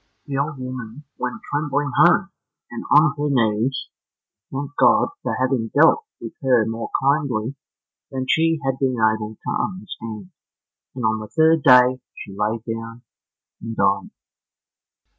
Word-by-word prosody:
The 140 Hz, -3 st, -5 dB
old 145 Hz, +2 st, -2 dB
woman 130 Hz, 0 st, -7 dB, 0.2 s
went 125 Hz, 0 st, -3 dB
trembling 145 Hz, -1 st, -1 dB
home, -, -, +4 dB, 0.4 s
and -, -, -6 dB
on 145 Hz, -, +5 dB
her 145 Hz, 0 st, -1 dB
knees 115 Hz, 0 st, 0 dB, 0.6 s
thanked 140 Hz, +1 st, -5 dB
God 275 Hz, -, +4 dB
for -, -, -2 dB
having 130 Hz, -3 st, 0 dB
dealt 165 Hz, -, +5 dB, 0.2 s
with -, -, -8 dB
her 125 Hz, -5 st, +3 dB
more 115 Hz, +1 st, -4 dB
kindly 135 Hz, -4 st, 0 dB, 0.6 s
than 130 Hz, -1 st, -4 dB
she 165 Hz, +1 st, +2 dB
had 135 Hz, -1 st, -1 dB
been 130 Hz, -2 st, +1 dB
able 110 Hz, -1 st, 0 dB
to -, -, -1 dB
understand, 110 Hz, -, -7 dB, 0.6 s
and 125 Hz, -3 st, -3 dB
on 110 Hz, 0 st, +1 dB
the 110 Hz, -, -7 dB
third 160 Hz, +4 st, +3 dB
day 125 Hz, -1 st, +6 dB, 0.2 s
she 95 Hz, -, -9 dB
lay 105 Hz, +3 st, -1 dB
down 115 Hz, +1 st, -6 dB, 0.6 s
and 115 Hz, 0 st, -6 dB
died. 100 Hz, -1 st, +1 dB
130 Hz, 140 wpm, -21 LUFS, 110-145 Hz, 0.6 s, day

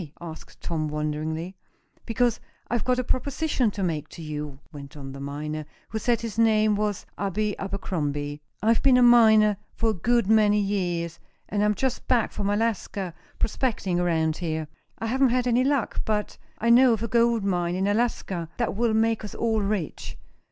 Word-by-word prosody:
asked 165 Hz, -2 st, -10 dB
Tom, 155 Hz, -2 st, -2 dB
wonderingly. 155 Hz, +4 st, -3 dB, 0.5 s
"Because 235 Hz, 0 st, +1 dB, 0.3 s
I've 235 Hz, -1 st, -1 dB
got 250 Hz, 0 st, +1 dB
a 255 Hz, -, 0 dB
proposition 260 Hz, 0 st, 0 dB
to 200 Hz, -1 st, -4 dB
make 155 Hz, -4 st, -2 dB
to 165 Hz, -, -10 dB
you," 150 Hz, -2 st, -5 dB
went 145 Hz, -1 st, -10 dB
on 135 Hz, -1 st, -7 dB
the 135 Hz, -, -9 dB
miner, 150 Hz, +2 st, -4 dB, 0.3 s
who 220 Hz, -, -3 dB
said 235 Hz, +1 st, +1 dB
his 230 Hz, -1 st, -4 dB
name 215 Hz, -2 st, +4 dB
was 210 Hz, -1 st, -2 dB
Abe 205 Hz, +2 st, -1 dB
Abercrombie. 145 Hz, -7 st, -3 dB, 0.2 s
"I've 225 Hz, +1 st, +3 dB
been 265 Hz, -2 st, +5 dB
a 250 Hz, -, +5 dB
miner 220 Hz, -4 st, +6 dB, 0.2 s
for 225 Hz, -1 st, +1 dB
a -, -, -2 dB
good 235 Hz, +5 st, +1 dB
many 210 Hz, 0 st, +4 dB
years, 175 Hz, -5 st, -1 dB, 0.3 s
and 205 Hz, 0 st, 0 dB
I'm 210 Hz, 0 st, +2 dB
just 260 Hz, +1 st, -2 dB
back 240 Hz, -3 st, +2 dB
from 200 Hz, -1 st, -2 dB
Alaska, 205 Hz, -4 st, -1 dB, 0.2 s
prospecting 210 Hz, -6 st, -1 dB
around 160 Hz, -3 st, +1 dB
here. 160 Hz, -3 st, -3 dB, 0.3 s
I -, -, -4 dB
haven't 260 Hz, +3 st, +3 dB
had 250 Hz, +1 st, +1 dB
any 245 Hz, +1 st, +3 dB
luck, 275 Hz, -3 st, 0 dB
but 210 Hz, -1 st, -1 dB, 0.2 s
I 230 Hz, +1 st, +2 dB
know 250 Hz, 0 st, +7 dB
of 225 Hz, 0 st, -2 dB
a -, -, -1 dB
gold 235 Hz, -1 st, +2 dB
mine 175 Hz, -3 st, 0 dB
in 190 Hz, +1 st, 0 dB
Alaska 205 Hz, -6 st, -1 dB
that -, -, -1 dB
will 225 Hz, 0 st, +1 dB
make 225 Hz, 0 st, +2 dB
us 210 Hz, -, -7 dB
all 225 Hz, -2 st, +1 dB
rich. 200 Hz, -5 st, -3 dB
205 Hz, 180 wpm, -25 LUFS, 170-230 Hz, 0.5 s, know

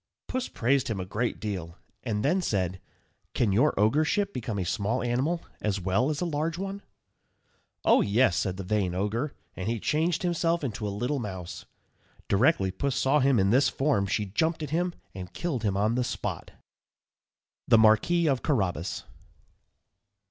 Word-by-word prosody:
Puss 255 Hz, 0 st, -2 dB
praised 130 Hz, +2 st, +1 dB
him 110 Hz, -4 st, -2 dB
a 90 Hz, -, -3 dB
great 110 Hz, +6 st, -2 dB
deal, 90 Hz, -6 st, -5 dB, 0.2 s
and 110 Hz, -2 st, -2 dB
then 180 Hz, +6 st, +2 dB
said, 95 Hz, -, -1 dB, 0.5 s
"Can 110 Hz, -5 st, +2 dB
your 120 Hz, +5 st, +3 dB
ogreship 155 Hz, -, +2 dB
become 115 Hz, -3 st, -3 dB
a 95 Hz, -, -1 dB
small 105 Hz, +8 st, -1 dB
animal 135 Hz, +8 st, 0 dB, 0.2 s
as 105 Hz, -2 st, 0 dB
well 95 Hz, +9 st, +1 dB
as 150 Hz, +1 st, -2 dB
a -, -, +1 dB
large 160 Hz, +1 st, -1 dB
one?" 195 Hz, +1 st, -4 dB, 1.0 s
"Oh, -, -, +6 dB
yes," 105 Hz, -2 st, +3 dB
said 95 Hz, -1 st, -1 dB
the 95 Hz, -, -4 dB
vain 95 Hz, -2 st, 0 dB
ogre; 110 Hz, +9 st, -1 dB, 0.2 s
and 95 Hz, -, -4 dB
he 115 Hz, 0 st, -1 dB
changed 160 Hz, -, 0 dB
himself 170 Hz, -1 st, +1 dB
into 110 Hz, -5 st, -3 dB
a -, -, -1 dB
little 125 Hz, +8 st, -2 dB
mouse. 95 Hz, -6 st, -6 dB, 0.6 s
Directly 100 Hz, -, +3 dB
Puss 135 Hz, +8 st, -2 dB
saw 135 Hz, +2 st, +3 dB
him 135 Hz, -2 st, +3 dB
in 95 Hz, -1 st, +3 dB
this 130 Hz, +4 st, +4 dB
form 135 Hz, -8 st, +1 dB
she 105 Hz, +1 st, 0 dB
jumped 160 Hz, -, 0 dB
at 145 Hz, -, -5 dB
him 175 Hz, +2 st, 0 dB, 0.2 s
and 90 Hz, -2 st, -8 dB
killed 160 Hz, -9 st, -2 dB
him 100 Hz, -3 st, 0 dB
on 105 Hz, +3 st, +2 dB
the 125 Hz, +1 st, +1 dB
spot. -, -, -4 dB, 1.2 s
_THE 115 Hz, -, +7 dB
MARQUIS 110 Hz, +11 st, +4 dB
OF 135 Hz, -4 st, +1 dB
CARRABAS. 95 Hz, -, -1 dB
120 Hz, 170 wpm, -27 LUFS, 100-150 Hz, 1.2 s, THE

